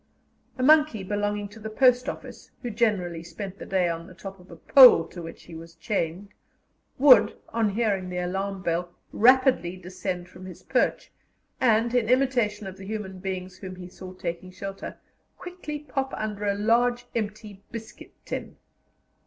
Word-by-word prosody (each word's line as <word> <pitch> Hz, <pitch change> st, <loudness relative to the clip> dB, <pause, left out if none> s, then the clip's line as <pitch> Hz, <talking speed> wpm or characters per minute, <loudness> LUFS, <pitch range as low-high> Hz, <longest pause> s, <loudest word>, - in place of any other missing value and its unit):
A 255 Hz, -, -2 dB
monkey 300 Hz, -7 st, +5 dB
belonging 205 Hz, +1 st, -2 dB
to 215 Hz, +2 st, -13 dB
the 220 Hz, 0 st, -6 dB
post 250 Hz, +2 st, +3 dB
office, -, -, -9 dB
who 240 Hz, -, -3 dB
generally 200 Hz, -7 st, 0 dB
spent 185 Hz, +4 st, -8 dB
the -, -, -8 dB
day 185 Hz, -2 st, +2 dB
on 165 Hz, 0 st, -4 dB
the 185 Hz, -, -14 dB
top 195 Hz, +1 st, -9 dB
of 180 Hz, -, -18 dB
a -, -, -10 dB
pole 250 Hz, -11 st, +8 dB
to 175 Hz, -, -9 dB
which 165 Hz, 0 st, -9 dB
he 170 Hz, -, -13 dB
was 165 Hz, +1 st, -10 dB
chained, 175 Hz, +2 st, -3 dB, 0.7 s
would, 250 Hz, -6 st, +6 dB
on 225 Hz, -2 st, +1 dB
hearing 200 Hz, -3 st, 0 dB
the 180 Hz, -, -4 dB
alarm 190 Hz, +2 st, -3 dB
bell, 175 Hz, +1 st, -1 dB, 0.2 s
rapidly 250 Hz, -7 st, +4 dB
descend 180 Hz, 0 st, -5 dB
from 180 Hz, +1 st, -12 dB
his 180 Hz, -, -11 dB
perch, -, -, 0 dB, 0.5 s
and, 230 Hz, 0 st, +3 dB
in 235 Hz, -3 st, +2 dB
imitation 245 Hz, -5 st, +2 dB
of 190 Hz, 0 st, -8 dB
the 190 Hz, -, -10 dB
human 200 Hz, -3 st, -5 dB
beings 185 Hz, -1 st, -5 dB
whom 185 Hz, -1 st, -7 dB
he 180 Hz, -1 st, -9 dB
saw 185 Hz, 0 st, -10 dB
taking 175 Hz, 0 st, -5 dB
shelter, 195 Hz, +1 st, -7 dB, 0.4 s
quickly 355 Hz, -4 st, -6 dB
pop 270 Hz, -2 st, -4 dB
under 210 Hz, -1 st, -3 dB
a 200 Hz, -, +1 dB
large 240 Hz, +3 st, +2 dB
empty 210 Hz, -2 st, -5 dB
biscuit 225 Hz, -1 st, -9 dB
tin. -, -, -5 dB
200 Hz, 170 wpm, -26 LUFS, 185-230 Hz, 0.7 s, pole